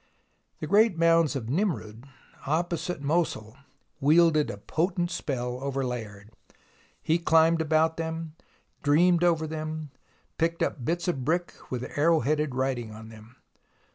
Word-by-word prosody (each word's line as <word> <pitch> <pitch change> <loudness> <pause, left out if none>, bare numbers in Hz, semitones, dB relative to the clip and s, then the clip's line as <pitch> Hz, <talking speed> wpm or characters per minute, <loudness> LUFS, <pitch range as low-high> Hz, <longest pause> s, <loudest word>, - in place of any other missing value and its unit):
The - - -2
great 210 -2 +4
mounds 165 -2 +3
of 130 -5 -3
Nimroud, 135 - -2 0.4
opposite 170 0 -2
Mosul, 140 -8 -1 0.4
wielded 155 +1 +4
a - - -5
potent 175 - -1
spell 125 -6 -3
over 135 -1 -2
Layard. 110 -4 -6 0.7
He 165 +2 +2
climbed 165 0 +4
about 160 +1 +2
them, 160 -1 -4 0.5
dreamed 170 +4 +3
over 165 -2 +2
them, 155 -1 -5 0.5
picked 165 0 +1
up 130 - -3
bits 170 +7 -2
of 140 -8 -1
brick 175 +5 -1 0.2
with 125 -1 -3 0.2
arrow 160 +1 +4
headed 150 0 0
writing 130 -4 -2
on 110 +1 -11
them. 110 +2 -15
155 Hz, 135 wpm, -27 LUFS, 130-165 Hz, 0.7 s, great